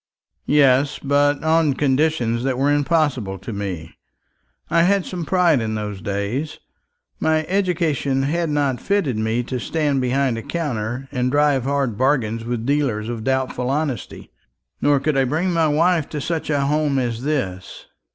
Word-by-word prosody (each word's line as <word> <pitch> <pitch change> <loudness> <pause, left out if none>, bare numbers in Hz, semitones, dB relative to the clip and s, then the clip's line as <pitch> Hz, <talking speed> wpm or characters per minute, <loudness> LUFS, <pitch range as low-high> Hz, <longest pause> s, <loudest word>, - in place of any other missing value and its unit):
"Yes, 140 -1 +4
but 145 +1 +1
on 160 -3 +3
conditions 130 -4 +1
that 130 -1 0
were 140 +2 +2
impossible 145 - 0
to 115 - -7
me. 95 -5 -5 0.7
I 170 +1 +3
had 190 +2 +2
some 175 -3 -5
pride 170 -5 +3
in 110 -1 -2
those 105 -3 -5
days. 100 +10 -3 0.6
My 155 0 +1
education 165 -8 0
had 165 +4 0
not 140 -4 0
fitted 200 - 0
me 110 +2 0
to 125 +1 -4
stand 145 0 0
behind 130 -1 0
a - - -6
counter 130 -5 -3
and 125 -2 0
drive 145 -2 +2
hard 135 -6 -1
bargains 120 -5 +1
with 120 -1 -3
dealers 130 -6 0
of 115 -2 -4
doubtful 130 0 -1
honesty. 140 -2 -3 0.5
Nor 145 -1 +3
could 150 +2 0
I 135 - +3
bring 160 +8 0
my 165 -1 +3
wife 160 +1 +2
to 150 - -4
such 160 +2 -3
a 145 -2 +1
home 145 0 +1
as 120 -3 -1
this." 125 -11 -3
140 Hz, 160 wpm, -21 LUFS, 120-155 Hz, 0.7 s, Yes